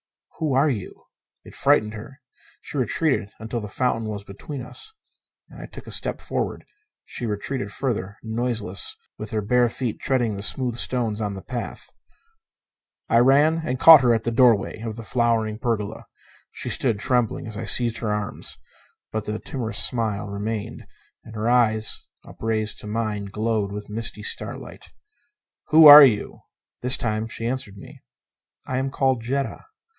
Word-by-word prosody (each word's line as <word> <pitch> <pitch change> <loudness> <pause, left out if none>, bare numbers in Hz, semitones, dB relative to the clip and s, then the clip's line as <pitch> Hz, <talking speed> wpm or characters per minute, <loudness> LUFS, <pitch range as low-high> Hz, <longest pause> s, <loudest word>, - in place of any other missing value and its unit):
"Who 155 -4 0
are 140 +3 +3
you?" 105 -7 -7 0.4
It - - -14
frightened 105 0 +2
her. 115 +6 -10 0.4
She - - -8
retreated 130 -3 0
until 110 +2 -4
the 105 - -6
fountain 115 0 -1
was 100 -2 -5
between 125 +7 -8
us. 440 - -4 0.6
And - - -14
as - - -7
I - - -14
took - - -11
a - - -9
step - - 0
forward, - - -4 0.4
she 120 - -5
retreated 110 +4 -3
further, 105 -6 -3
noiseless, 110 -3 -2 0.2
with 110 - -6
her 110 -1 -2
bare 120 +3 +3
feet 120 -1 -4
treading 120 -5 0
the 100 - -6
smooth 125 +3 0
stones 115 -4 0
the 100 -3 -4
path. 125 -3 -6 1.2
I 115 - +4
ran 145 +6 +4
and 130 -4 -3
caught 160 -1 +10
her 120 -2 +4
at 115 - -2
the 120 - -1
doorway 115 -4 +3
of 110 -1 -5
the 115 - -8
flowered 110 -1 0
pergola. 110 -3 -3 0.4
She - - -4
stood 115 -6 +1
trembling 120 0 0
as 110 -2 -6
I 110 +2 -5
seized 115 +1 +2
her 110 -3 -2
arms. 105 -1 -4 0.5
But 110 -1 -3
the 105 0 -3
timorous 115 -3 -5
smile 110 -4 -2
remained, 105 +2 -5 0.4
and 115 - -12
her 110 +1 -2
eyes, 110 -3 +2 0.2
upraised 110 -1 -3
to - - -8
mine, 105 -1 -2
glowed 105 0 -2
with 105 +1 -7
misty 110 -1 -4
starlight. - - -4 0.8
"Who 160 +1 +7
are 150 0 +13
you?" 110 -7 +2 0.4
This 125 +1 +4
time 110 -1 -2
she 115 0 -5
answered 120 -5 -4
me. - - -13 0.6
"I 130 - -2
am 135 +1 -1
called 130 -2 0
Jetta." 135 - -3
115 Hz, 165 wpm, -23 LUFS, 105-125 Hz, 1.2 s, are